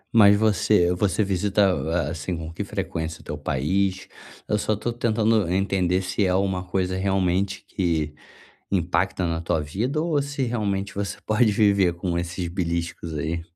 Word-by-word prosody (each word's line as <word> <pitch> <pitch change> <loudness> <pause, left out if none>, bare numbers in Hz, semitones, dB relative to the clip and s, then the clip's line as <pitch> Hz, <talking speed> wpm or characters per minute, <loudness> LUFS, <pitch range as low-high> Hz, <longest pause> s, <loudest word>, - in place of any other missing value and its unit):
Mas 105 -2 +8
você 105 -4 +3
você 95 +2 +1
visita 100 +1 +1
a 80 +2 -1
assim, 85 +2 -4
com 80 0 -7
que - - -3
frequência 80 0 -4
o - - -18
teu - - -5
país? 95 +8 -1 0.4
Eu 105 - +1
só 110 - 0
tô 115 +3 -3
tentando 110 -4 +1
entender 95 -1 +1
se 95 +3 -1
é 95 - +2
alguma 95 0 +1
coisa 95 0 -1
realmente 95 0 0
que 80 -5 -1 0.6
impacta 90 0 +1
na 85 0 -2
tua 85 -1 0
vida 110 - -2
ou 155 -3 +1
se 140 0 -4
realmente 100 -5 -2
você 100 0 -3
pode 110 0 +3
viver 100 -4 +3
com 85 0 -2
esses 85 0 -3
beliscos 85 -1 -3
aí? 80 +3 -2
95 Hz, 165 wpm, -24 LUFS, 85-105 Hz, 0.6 s, Mas